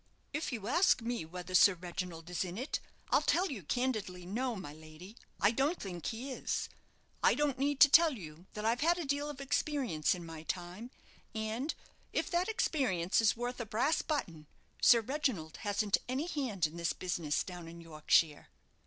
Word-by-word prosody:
"If 305 +1 -2
you 220 -5 -4
ask 340 -3 +4
me 235 -7 -2
whether 180 +2 -8
Sir 185 +1 +7
Reginald 175 -1 -6
is 180 - 0
in 180 +1 -6
it, 260 +5 -2 0.3
I'll - - +5
tell 370 -1 +2
you 235 -8 -5
candidly, 205 - -2
no, 240 +6 -1
my 175 -7 -7
lady, 155 +6 -12 0.2
I 205 - +5
don't 275 +8 +1
think 175 -4 -5
he 245 +5 -4
is. 255 - -2 0.5
I - - +5
don't 290 -3 0
need 285 0 +1
to 290 - +11
tell 320 +2 +6
you 170 -5 -10
that 210 0 -4
I've 230 +4 +2
had 340 +3 +4
a 345 - -3
deal 285 +1 -1
of 290 -2 -7
experience 270 - 0
in 175 -1 -8
my 165 -1 -8
time; 180 +7 -5 0.5
and, 220 +7 -2 0.4
if - - -1
that 355 +3 +1
experience 250 - +1
is 225 0 +3
worth 245 +1 -3
a 235 - -3
brass 255 +9 +1
button, 165 - -3 0.3
Sir 235 -1 +7
Reginald 235 - -2
hasn't 205 -1 +1
any 265 +5 -1
hand 255 - -1
in 155 +2 -4
this 170 0 0
business 170 -5 -1
down 175 -3 -8
in 170 +1 -10
Yorkshire." 155 -1 +1
215 Hz, 185 wpm, -33 LUFS, 175-275 Hz, 0.5 s, to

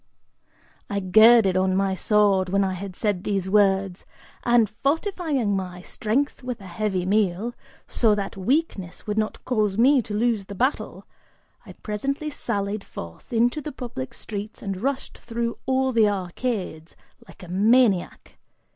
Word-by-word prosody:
I 200 - -1
girded 215 +1 +6
on 185 0 +2
my 195 0 +1
sword, 195 -1 +2
when 200 +1 +2
I 190 -1 -1
had 185 0 -7
said 205 -3 -1
these 195 -2 -1
words, 195 -2 +2 0.4
and, 240 -2 +4
fortifying 280 - -1
my 180 -2 -5
strength 245 +11 -1
with 250 -2 -5
a 195 - -12
heavy 185 0 -2
meal, 205 +3 +1 0.3
so 220 -3 +2
that 200 -1 -4
weakness 195 - -2
would 210 0 -1
not 215 0 -3
cause 215 -5 0
me 260 +3 +5
to 210 -2 -6
lose 225 -2 +1
the 200 - -8
battle, 255 +8 -1 0.6
I - - -10
presently 275 +8 -3
sallied 205 -5 -2
forth 85 -1 -10
into 240 +5 +2
the 300 - -6
public 255 -1 -6
streets 210 0 -7
and 195 -2 -4
rushed 270 +2 -3
through 235 0 -3
all 265 0 +2
the 225 -3 +4
arcades, 185 -3 -4 0.3
like 200 - -15
a - - -9
maniac. 205 +1 +2
210 Hz, 150 wpm, -24 LUFS, 190-240 Hz, 0.6 s, girded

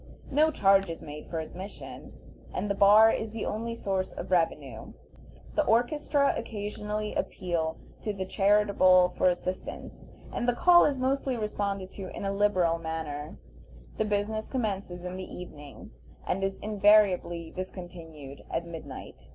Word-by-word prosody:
No 305 +3 +4
charge 195 - +4
is 165 - -5
made 150 0 -9
for 165 - -2
admission, 185 +5 -8 0.4
and 205 - -1
the - - +2
bar 210 +3 +7
is 220 -1 -3
the 225 - -3
only 230 +2 -3
source 190 -4 -2
of - - -7
revenue. 145 -9 -1 0.6
The - - +2
"orchestra" 280 +5 +2
occasionally 210 -1 -4
appeal 170 -4 -2 0.2
to 215 - -2
the 190 -2 -4
charitable 195 -2 +4
for - - +3
assistance, 180 +1 -5 0.2
and 240 - 0
the 245 - +1
call 350 +5 +7
is 285 -2 +1
mostly 260 0 0
responded 200 -3 -3
to 190 -2 -7
in - - -4
a 195 - 0
liberal 185 -5 +2
manner. 160 -3 -5 0.6
The 220 - +2
business 210 +1 -1
commences 195 -7 -3
in 180 +1 -5
the 185 - -7
evening, 145 -5 -10 0.3
and 195 +2 -1
is 195 0 -1
invariably 200 -5 +3
discontinued 165 -6 -8
at 170 - -2
midnight. 165 -2 -9
195 Hz, 145 wpm, -28 LUFS, 175-215 Hz, 0.6 s, bar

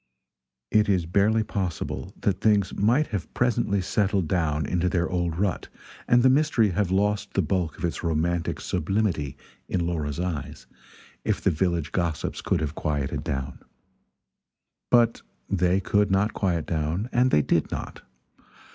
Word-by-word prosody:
It 105 -1 +3
is 90 -4 +2
barely 105 +6 +2
possible 95 -5 -4
that 95 -2 0
things 105 -3 +3
might 120 +9 +3
have 95 -7 -4
presently 110 -5 +1
settled 95 -2 +1
down 75 -3 0
into 90 +3 0
their 85 0 0
old 85 -2 -1
rut 95 -1 -1 0.4
and 120 0 +5
the - - +6
mystery 130 -7 +3
have 100 +1 0
lost 105 +2 0
the 95 - +2
bulk 90 -1 -1
of - - -3
its 85 - -3
romantic 85 0 -1
sublimity 90 -4 -1 0.3
in 85 -2 0
Laura's 80 -3 -2
eyes, 80 -8 -4 0.6
if - - 0
the - - +2
village 85 -1 -1
gossips 85 -4 -2
could 85 - 0
have 75 -1 -2
quieted 70 -4 -2
down. 70 0 -4 1.3
But 120 -2 +4 0.3
they 90 -1 +2
could 105 +1 +1
not 95 +3 +2
quiet 85 -6 0
down 80 +7 -1
and 125 +1 +4
they 75 - +3
did - - +1
not. - - -6
90 Hz, 150 wpm, -25 LUFS, 80-105 Hz, 1.3 s, the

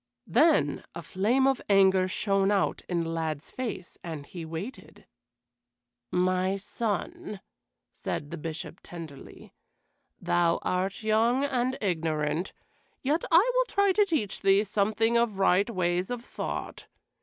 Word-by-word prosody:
Then 325 - +3
a - - -6
flame 230 +8 +1
of 270 -2 +2
anger 190 -2 +5
shone 195 +1 +1
out 200 -2 +1
in 175 -2 +1
the 165 - -3
lad's 160 -2 -3
face, 230 -8 -5
and 160 -4 -6
he 170 +2 -8
waited. 165 +11 -8 1.0
"My 185 +1 +1
son," 205 0 -3 0.5
said 145 - -4
the - - -4
Bishop 160 +1 -6
tenderly, 160 -6 -11 0.7
"thou 175 -1 +2
art 190 +3 -1
young 230 +5 +3
and 255 -1 0
ignorant, 160 -2 -1 0.5
yet 300 +5 +1
will 330 - +8
I - - +4
try 400 -3 +3
to 415 +3 +4
teach 310 - -1
thee 195 +1 +4
something 220 +3 +1
of 235 -4 +1
right 195 +2 +3
ways 180 -3 0
of 245 -1 -5
thought. - - -5
195 Hz, 130 wpm, -28 LUFS, 175-235 Hz, 1.0 s, will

